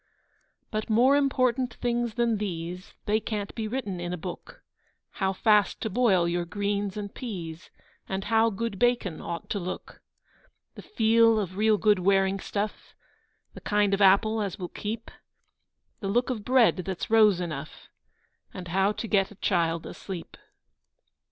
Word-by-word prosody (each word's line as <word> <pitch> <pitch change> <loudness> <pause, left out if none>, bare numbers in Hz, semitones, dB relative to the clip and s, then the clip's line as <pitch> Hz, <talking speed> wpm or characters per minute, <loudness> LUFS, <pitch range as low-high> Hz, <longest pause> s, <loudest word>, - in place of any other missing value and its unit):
But 215 +1 -3
more 245 +6 +5
important 255 -3 +1
things 240 -2 -1
than 235 -2 +1
these, 180 -2 -5
They 215 0 +2
can't 210 -2 -4
be 220 -2 -3
written 215 -6 -3
in 175 0 -4
a - - -3
book: 175 +2 -9 0.6
How 190 0 +2
fast 210 +1 +3
to 220 - -2
boil 195 -6 +3
your 175 0 0
greens 200 +2 -2
and 205 -1 -5
peas, 170 -9 -7 0.4
And 190 0 -2
how 225 +2 +3
good 220 -1 -4
bacon 240 -9 +1
ought 170 0 -5
to 200 - 0
look; 180 0 -7 0.7
The - - -10
feel 225 - +3
of 185 -3 -4
real 215 +1 +3
good 210 -2 +3
wearing 195 +1 +2
stuff, 205 +2 -4 0.6
The - - -11
kind 205 -1 +1
of 195 - +1
apple 210 +3 +4
as 200 -3 -3
will 180 -2 -5
keep, 220 +2 -5 0.9
The 195 - -4
look 245 +5 +1
of 220 -5 -4
bread 250 -2 +4
that's 185 +2 -4
rose 215 -5 +5
enough, 155 -4 -6 0.7
And 180 -2 -7
how 195 +4 +2
to 225 - -5
get 195 -2 +2
a 210 - -14
child 170 -4 0
asleep. 185 -4 -8
205 Hz, 160 wpm, -27 LUFS, 185-225 Hz, 0.9 s, more